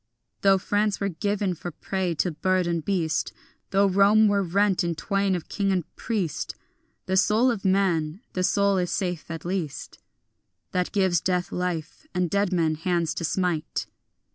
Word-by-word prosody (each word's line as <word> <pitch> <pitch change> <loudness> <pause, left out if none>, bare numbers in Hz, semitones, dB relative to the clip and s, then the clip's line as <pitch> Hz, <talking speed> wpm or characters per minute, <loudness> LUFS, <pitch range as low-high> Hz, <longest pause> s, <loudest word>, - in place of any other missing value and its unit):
Though 195 -1 +5
France 205 +2 0
were 200 - 0
given 200 +2 -1
for 175 +1 -6
prey 180 +1 -2
to 175 +3 0
bird 185 +4 +1
and 170 -2 -1
beast, 170 -5 -1 0.4
Though 200 +1 +3
Rome 200 +3 +5
were 205 -1 +2
rent 195 +1 +2
in 170 -1 -1
twain 195 +3 0
of 175 - -5
king 200 -1 0
and 180 -4 -2
priest, 200 - -2 0.5
The 190 - 0
soul 215 +6 +4
of 220 -5 -4
man, 185 -3 +1
the 185 - -1
soul 200 +1 +3
is 180 -1 -1
safe 180 -5 -2
at 165 0 -6
least 175 -6 -4 0.7
That 180 -1 -1
gives 190 -4 +2
death 180 -1 -1
life 180 - -4
and 180 -2 0
dead 200 -1 +1
men 165 -3 +2
hands 165 +1 0
to - - -4
smite. 170 -2 -1
185 Hz, 165 wpm, -25 LUFS, 170-200 Hz, 0.7 s, Though